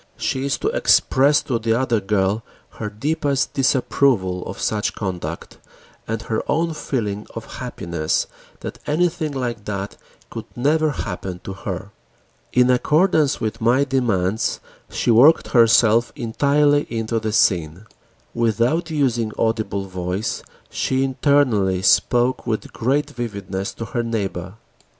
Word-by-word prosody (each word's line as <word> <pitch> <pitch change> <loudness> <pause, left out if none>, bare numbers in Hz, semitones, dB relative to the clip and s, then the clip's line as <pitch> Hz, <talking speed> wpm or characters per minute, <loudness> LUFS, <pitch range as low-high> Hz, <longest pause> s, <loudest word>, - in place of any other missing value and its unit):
She 130 - -2
is 140 - 0
to - - -2
express 145 - +3
to 120 -4 -1
the 115 +1 +1
other 120 -4 +1
girl 100 +1 0 0.4
her 105 - -3
deepest 140 +4 -1
disapproval 125 -8 +1
of 95 - -6
such 105 -1 -1
conduct 90 -5 -5 0.5
and 115 0 -3
her 110 -1 -1
own 165 +2 +1
feeling 105 -9 -3
of - - -8
happiness 85 -2 -2 0.4
that - - -7
anything 155 0 0
like 120 -6 -4
that 100 -1 -4 0.3
could - - -6
never 155 +5 +2
happen 95 -8 -5
to 95 - -6
her. 95 - -6 0.6
In 125 0 +4
accordance 155 +3 +2
with 110 +1 -3
my 120 +5 +3
demands, 115 -7 0 0.3
she - - 0
worked 130 +8 +5
herself 115 -1 +4
entirely 145 +5 +2
into 115 0 -2
the 110 0 -3
scene: 90 -2 +1 0.5
without 120 - +1
using 125 -8 0
audible 110 -3 -1
voice, 90 +2 -3 0.3
she 130 0 0
internally 125 -9 +2
spoke 120 +6 +2
with 110 -2 -3
great 135 +5 0
vividness 100 -5 -4
to 115 - -5
her 120 - -2
neighbor. 100 -5 -3
115 Hz, 130 wpm, -21 LUFS, 100-135 Hz, 0.6 s, worked